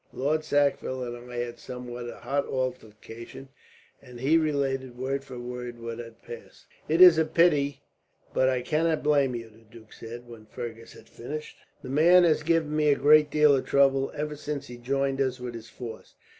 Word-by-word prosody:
Lord 150 +4 0
Sackville 140 -3 0
and 120 0 -8
I - - -7
had 120 0 -3
a - - -22
somewhat 125 -1 -7
hot 140 +3 -3
altercation;" 120 0 -6 0.5
and 125 -3 -12
he 140 +6 +2
related, 135 -5 0
word 135 +2 -2
for 130 -2 -10
word, 120 0 -7
what 115 0 -6
had 115 -1 -11
passed. - - -11 0.2
"It 165 +3 +3
is 175 -3 +9
a - - +4
pity, 155 -4 +2 0.5
but 130 - +3
I 125 -1 -1
cannot 160 +2 0
blame 140 -4 +2
you," 115 -1 -6
the 110 - -20
duke 115 -1 -17
said, 120 +1 -10
when 115 -2 -13
Fergus 115 0 -8
had - - -16
finished. 150 +6 -7 0.3
"The 130 - -7
man 170 +6 +6
has 160 -3 +3
given 160 -1 0
me 155 -1 +2
a 145 - +5
great 150 +1 +5
deal 150 -1 +5
of 130 - -2
trouble, 135 -1 +3
ever 150 0 -3
since 145 -1 -5
he 120 -3 -10
joined 135 +2 -1
us 130 -1 -1
with 125 -1 -6
his 115 -1 -9
force. 115 0 -10
135 Hz, 190 wpm, -27 LUFS, 120-150 Hz, 0.5 s, is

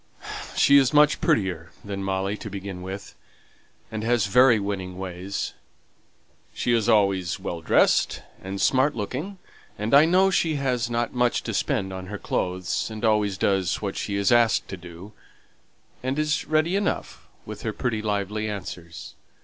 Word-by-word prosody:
"She 140 - +6
is 135 +2 +1
much 150 0 +5
prettier 90 -5 0 0.2
than 100 -1 -4
Molly 95 +1 -1
to 110 - -7
begin 95 -2 -6
with, 95 +2 -7 0.8
and 110 -1 -4
has 120 -2 +2
very 120 +3 +5
winning 95 -2 -4
ways. 95 +1 -4 1.0
She's 120 -2 +1
always 100 -5 +2
well 85 -1 -5
dressed - - +2 0.2
and 95 +1 -5
smart 135 +7 +3
looking, 135 - -4 0.4
and 105 +4 -2
I 145 +3 +8
know 185 +3 +4
she 165 -4 +1
hasn't 120 -4 -1
much 125 -1 +1
to 115 - -4
spend 100 -5 -1
on 95 0 -7
her 105 +2 -5
clothes, 90 0 -2
and 110 +1 -4
always 105 -3 +2
does 95 -2 +1
what 100 -2 -3
she's 100 0 0
asked 120 -1 +3
to - - -4
do, 90 +3 -11 0.9
and 130 +2 -2
is 155 +1 0
ready 155 +4 +1
enough 200 0 -2 0.2
with - - -8
her - - -2
pretty, 110 -3 -2
lively 105 0 -2
answers. 90 -4 -7
105 Hz, 150 wpm, -25 LUFS, 95-125 Hz, 1.0 s, I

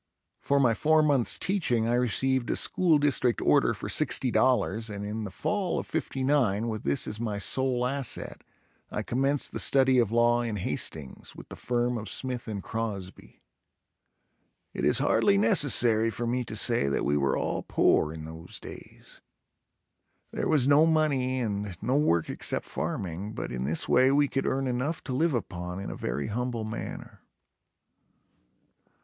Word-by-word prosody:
For 140 0 +1
my 125 -4 +4
four 155 +6 +3
months 140 -6 +2
teaching 125 - 0
I 120 - +1
received 125 +1 0
a - - +1
school 170 -4 +2
district 140 -4 +2
order - - +3
for - - -6
$60.00 115 -4 +1
and 100 -1 -6
in 105 +1 -4
the - - -5
fall 195 - -2
of - - -3
'59 130 -7 0
with 110 -2 -4
this 70 0 +1
as 105 - -4
my 110 -3 -3
sole 125 +3 0
asset, 135 -1 -3 0.5
I - - -3
commenced 135 +3 0
the - - -4
study 130 -1 +4
of 115 -3 +1
law 120 +1 +3
in 115 -3 -3
Hastings, 80 -7 -4
with - - -12
the - - -8
firm 120 0 -1
of 110 -2 -6
Smith 125 -2 -2
and 100 -3 -5
Crosby. 105 - -6 1.3
It - - -2
is - - +3
hardly 100 - +3
necessary 115 0 +3
for 115 +2 -4
me 125 +1 -1
to 110 - -6
say 110 -7 +1
that 70 - -1
we 70 - +1
were 70 -2 +1
all - - -2
poor 75 - +2
in 80 -1 -8
those 80 +2 -9
days. - - -13 1.1
There - - -2
was 145 -5 +3
no 145 +3 +5
money 140 -5 +1
and 100 -5 -3
no 125 +5 -1
work 85 - +2
except - - -2
farming, 95 +4 -4
but - - -5
in 65 +1 -3
this 80 +4 0
way 130 +1 +4
we 145 +1 +3
could 135 0 -2
earn 135 +1 0
enough 130 +6 -2
to 130 - -5
live 155 +2 +1
upon 90 -4 -5
in 100 - -5
a - - -6
very 70 - -3
humble 120 +1 -3
manner. 110 +1 -7
120 Hz, 165 wpm, -27 LUFS, 105-135 Hz, 1.3 s, no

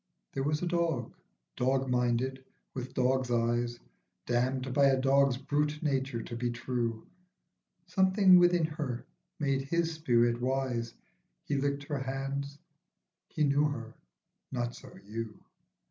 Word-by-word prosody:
There 135 - -2
was 150 +4 0
a - - 0
dog, 170 -9 0 0.4
dog 130 +1 +1
minded, 125 +1 0 0.3
with 130 0 -6
dog's 130 0 +2
eyes, 120 0 0 0.5
Damned 130 +1 0
by 140 +1 +5
a 135 -1 +4
dog's 135 -1 +3
brute 150 +2 -1
nature 135 -5 -1
to 120 - -6
be 120 +1 -1
true. 120 -1 -2 0.8
Something 190 +1 +5
within 175 -2 +4
her 150 -6 -4 0.3
made 140 -2 +1
his 165 +4 0
spirit 120 -6 +2
wise; 125 -3 -1 0.5
He 145 - -2
licked 140 +1 0
her 145 -1 -3
hand, 135 +1 -3 0.8
he 155 - -1
knew 145 +1 +3
her; 115 -6 -4 0.6
not 120 -2 -2
so - - -12
you. 110 +1 -6
135 Hz, 130 wpm, -31 LUFS, 120-145 Hz, 0.8 s, by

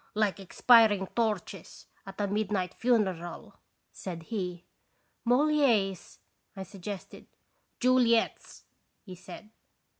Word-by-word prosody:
"Like 210 -2 0
expiring 205 0 +4
torches 210 -5 -3 0.2
at 195 +1 -10
a 205 - +1
midnight 200 -2 -2
fu 245 0 +2
neral," 175 -5 -4 0.3
said 170 -3 -7
he. 180 -3 -5 0.3
" - - -45
Moliere's! 245 - +2 0.2
" - - -47
I 190 - -6
suggested. 195 +1 -9 0.5
"Juliet's," 245 -2 +1 0.4
he 185 - -10
said. 210 +4 -12
205 Hz, 110 wpm, -29 LUFS, 190-230 Hz, 0.5 s, expiring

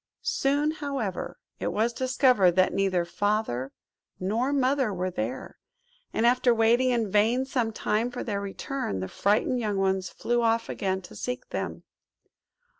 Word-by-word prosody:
Soon, 285 +3 +1
however, 275 - -4 0.2
it - - -1
was 230 +3 +1
discovered 255 -7 +3
that 185 +1 +3
neither 190 -3 +1
Father 185 - -1 0.5
nor 225 +8 0
Mother 270 -3 +2
were 185 -1 -2
there; 120 -3 -5 0.5
and 225 - 0
after 245 0 +4
waiting 235 +3 +4
in 230 -5 0
vain 225 +6 +3
some 250 -4 -1
time 220 +2 0
for 245 0 -5
their 200 -3 -2
return, 200 - -4
the 95 - -3
frightened 210 - +1
young 210 -4 -1
ones 190 -1 0
flew 240 0 -1
off 230 0 +1
again 190 -1 -2
to - - -12
seek 250 +1 -5
them. - - -4
225 Hz, 150 wpm, -27 LUFS, 190-250 Hz, 0.5 s, after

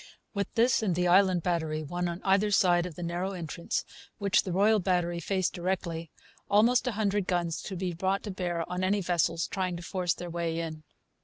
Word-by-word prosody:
With 200 -2 -2
this 235 +1 +4
and 190 -6 0
the 180 +1 +1
Island 185 -1 +4
Battery, 160 -3 -1
one 175 +4 -2
on 170 +2 -5
either 200 +2 +3
side 180 -3 +3
of 170 - -10
the 175 - -6
narrow 175 +3 -2
entrance, 170 -1 -3 0.3
which 200 -2 +3
the 185 - -5
Royal 210 +4 +4
Battery 175 -2 0
faced 185 +2 0
directly, 170 -2 -3 0.4
almost 230 +5 +4
a 250 - 0
hundred 205 -2 0
guns 175 -3 -1
could 190 - -6
be 180 0 -2
brought 190 +3 -1
to 210 - -4
bear 175 -3 -2
on 180 +1 -3
any 200 +2 +2
vessels 170 -2 +1
trying 185 -2 -2
to 170 - -8
force 180 -1 -1
their 175 - -7
way 165 -1 -2
in. 160 -2 -4
180 Hz, 205 wpm, -29 LUFS, 170-195 Hz, 0.4 s, this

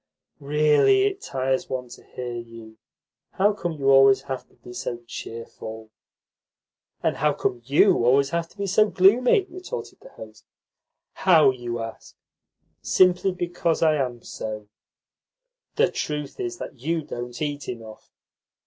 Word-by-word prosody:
"Really 150 - +3
it 395 -1 -1
tires 130 0 -2
one 125 -1 -4
to - - -13
hear 125 -1 -7
you. 115 -2 -10 0.5
How 205 +2 +3
come 175 -4 -4
you 135 -3 +1
always 135 -1 +6
to 135 -2 -5 0.2
be 120 - -10
so 120 -1 -4
cheerful?" 110 -1 -8 1.1
"And - - 0
how - - +2
come 120 - -2
YOU 150 - +4
always 135 +3 +3
to 170 0 -2
be 200 - -2
so 210 +2 +3
gloomy?" 240 - +4
retorted 370 +7 -8
the - - -14
host. - - -13 0.7
"How, 160 -7 +5
you 120 -2 -5
ask? 115 -1 -9 0.7
Simply 185 +1 +3
because 175 -2 -1
I 160 -1 +5
am 125 -4 -3
so." 105 -1 -7 1.1
"The - - +3
truth 150 -2 -4
is 360 -2 -4
you 160 +5 -2
don't 120 -2 -7
eat 145 -2 -4
enough. 110 -3 -9
140 Hz, 135 wpm, -24 LUFS, 120-180 Hz, 1.1 s, always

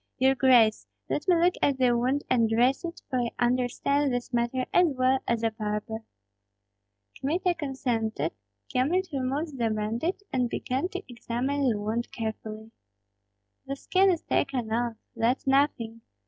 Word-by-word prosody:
Your 265 +1 +4
grace, 245 -5 +4 0.2
let 295 - -1
me 360 - +5
look 350 +2 +4
at 280 -2 +2
the 250 -2 +3
wound 255 +4 +1
and 230 -3 +3
dress 245 +6 +2
it, 340 0 -6
for 255 -3 -1
I 240 -1 0
understand 255 +3 +1
this 245 0 -3
matter 240 +2 0
as 355 0 +6
well 260 +1 +3
as 235 -1 0
a 225 - +2
barber." 215 +1 -4 1.2
Kmita 345 +7 +1
consented. 235 - -2 0.4
Kyemlich 340 +8 +1
removed 275 +2 -2
the 230 -1 +2
bandage, 225 - -2
and 250 -2 +1
began 260 +9 -1
to 375 - -5
examine 255 +3 -1
the 215 -3 0
wound 220 +3 -2
carefully. 220 -1 -5 1.0
"The 275 - -2
skin 380 +7 +3
is 345 -3 0
taken 245 -5 -1
off, 235 0 0 0.2
that's 240 +3 +1
nothing! 265 -5 +1
250 Hz, 150 wpm, -27 LUFS, 230-280 Hz, 1.2 s, as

